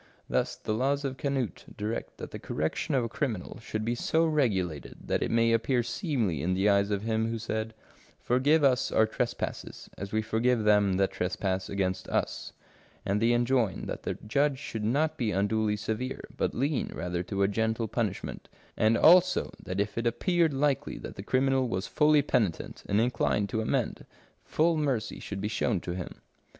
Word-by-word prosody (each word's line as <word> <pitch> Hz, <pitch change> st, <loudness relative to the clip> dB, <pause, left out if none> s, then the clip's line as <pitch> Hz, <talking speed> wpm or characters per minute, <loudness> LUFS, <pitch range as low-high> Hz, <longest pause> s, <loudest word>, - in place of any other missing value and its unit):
Thus -, -, 0 dB
the 110 Hz, -, -3 dB
laws 140 Hz, +5 st, 0 dB
of 135 Hz, -1 st, -3 dB
Canute 135 Hz, -5 st, -2 dB
direct 105 Hz, +3 st, -4 dB
that -, -, -7 dB
the -, -, -6 dB
correction 80 Hz, -, -2 dB
of 130 Hz, -, +2 dB
a -, -, -1 dB
criminal 120 Hz, -4 st, -3 dB
should 110 Hz, -1 st, -4 dB
be 120 Hz, -, +1 dB
so 160 Hz, +7 st, +1 dB
regulated 100 Hz, -, 0 dB
that -, -, 0 dB
it -, -, 0 dB
may 115 Hz, 0 st, +3 dB
appear 120 Hz, +2 st, +2 dB
seemly 115 Hz, -, -1 dB
in 90 Hz, +4 st, 0 dB
the 95 Hz, +2 st, +2 dB
eyes 100 Hz, 0 st, +3 dB
of 100 Hz, -1 st, -1 dB
Him 110 Hz, 0 st, 0 dB
who 115 Hz, -, -2 dB
said, 110 Hz, 0 st, -3 dB, 0.2 s
" -, -, -28 dB
Forgive 145 Hz, +6 st, +3 dB
us 130 Hz, -2 st, +3 dB
our 110 Hz, -, +4 dB
trespasses, 120 Hz, +2 st, -4 dB
as 100 Hz, 0 st, -5 dB
we 110 Hz, 0 st, 0 dB
forgive 115 Hz, +1 st, +1 dB
them 105 Hz, -2 st, +4 dB
that 95 Hz, +1 st, +2 dB
trespass 95 Hz, +1 st, -2 dB
against 95 Hz, -2 st, -1 dB
us," -, -, -2 dB, 0.5 s
and 100 Hz, +2 st, 0 dB
they 115 Hz, +1 st, +4 dB
enjoin 120 Hz, -4 st, +1 dB
that -, -, -5 dB
the -, -, -3 dB
judge 140 Hz, +5 st, +2 dB
should 115 Hz, -5 st, -5 dB
not 150 Hz, +8 st, +1 dB
be 115 Hz, -4 st, 0 dB
unduly 105 Hz, +2 st, +1 dB
severe, 110 Hz, +5 st, -3 dB
but -, -, -1 dB
lean 140 Hz, +3 st, 0 dB
rather 90 Hz, 0 st, -2 dB
to 100 Hz, +2 st, -1 dB
a -, -, +4 dB
gentle 110 Hz, +2 st, 0 dB
punishment; 105 Hz, -3 st, -3 dB, 0.3 s
and 110 Hz, +1 st, +3 dB
also 180 Hz, +3 st, +5 dB
that 95 Hz, 0 st, -4 dB
if 105 Hz, +3 st, -1 dB
it 120 Hz, -, 0 dB
appeared 165 Hz, -, +2 dB
likely 140 Hz, -1 st, 0 dB
that -, -, -7 dB
the -, -, -6 dB
criminal 130 Hz, +3 st, +2 dB
was 95 Hz, -1 st, -2 dB
fully 150 Hz, -1 st, +4 dB
penitent 105 Hz, -, -1 dB
and 100 Hz, -, +3 dB
inclined 115 Hz, -3 st, +1 dB
to 110 Hz, -, -1 dB
amend, 110 Hz, -, -1 dB, 0.4 s
full 165 Hz, +1 st, +2 dB
mercy 135 Hz, -8 st, -1 dB
should 100 Hz, -, -6 dB
be 105 Hz, -, -1 dB
shown 105 Hz, -2 st, 0 dB
to 90 Hz, -, -5 dB
him. 90 Hz, 0 st, -6 dB
110 Hz, 185 wpm, -29 LUFS, 100-130 Hz, 0.5 s, also